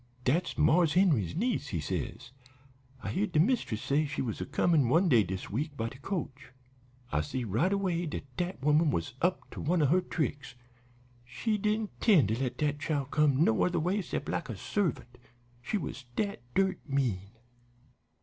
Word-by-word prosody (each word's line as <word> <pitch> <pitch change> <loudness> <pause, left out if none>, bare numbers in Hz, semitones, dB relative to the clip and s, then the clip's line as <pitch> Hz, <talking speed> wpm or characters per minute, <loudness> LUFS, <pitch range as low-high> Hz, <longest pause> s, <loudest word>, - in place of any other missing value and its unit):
"'Dat's 160 +9 0
Marse 165 -2 +4
Henry's 160 - +3
niece,' 215 - 0
he 90 -11 -2
says. 100 +10 -4 0.7
'I - - -3
heared 195 +2 -1
de 150 - +3
mistress 165 - +1
say 140 +3 +2
she 140 - -5
was 115 -4 -4
a - - -4
comin' 145 -2 +2
one 170 +8 +4
day 120 -9 +6
dis 95 -1 -4
week 145 +6 -3
by 115 0 -2
de 130 - -13
coach.' 145 -5 -5 0.6
"I 75 - +1
see 125 - -3
right 115 - +1
away 180 -4 0
dat 150 - -4
dat 175 -6 -3
woman 150 +2 +4
was 85 - -2
up 180 +2 0
to - - -7
one 175 +3 +1
of 145 -4 +3
her 180 +4 +4
tricks; 140 -6 -3 0.7
she 130 - -2
didn't 210 +1 0
'tend 170 - +5
to 110 +2 0
let 125 -2 -2
dat 145 -1 0
chile 150 -2 -1
come 150 -1 +3
no 110 -8 +3
other 180 -1 +1
way 185 +6 0
'cept - - -4
like - - -3
a - - -5
servant; 125 - -2 0.4
she 165 - -1
was 140 -7 -6
dat 200 - -2
dirt 190 0 +2
mean. 115 -9 0
150 Hz, 185 wpm, -30 LUFS, 125-180 Hz, 0.7 s, day